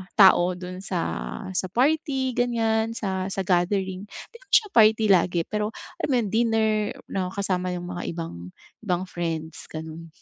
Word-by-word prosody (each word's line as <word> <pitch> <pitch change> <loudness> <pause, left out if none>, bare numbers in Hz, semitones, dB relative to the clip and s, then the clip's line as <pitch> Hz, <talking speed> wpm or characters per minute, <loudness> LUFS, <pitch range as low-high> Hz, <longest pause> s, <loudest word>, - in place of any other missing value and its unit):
tao 185 -3 +6
do'n 180 0 -7
sa 190 -2 -3 0.5
sa 185 0 -1
party 265 - +1
ganiyan, 225 -2 +1
sa 190 -4 -2
sa 195 0 -2
gathering, 190 +2 0
di 470 - -12
naman - - -23
siya 420 - +5
party 220 -1 +5
lagi 175 -2 +3
pero 210 0 -2 0.3
alam - - -1
mo - - +3
'yon, 205 - -3
dinner 225 -1 +2 0.4
na 190 -2 -1
kasama 185 -2 -1
yung 175 0 -6
mga 175 -1 -5
ibang 90 - -6 0.4
ibang 180 -3 0
friends, 165 -2 -4
gano'n. 160 +1 -7
190 Hz, 160 wpm, -25 LUFS, 175-220 Hz, 0.5 s, tao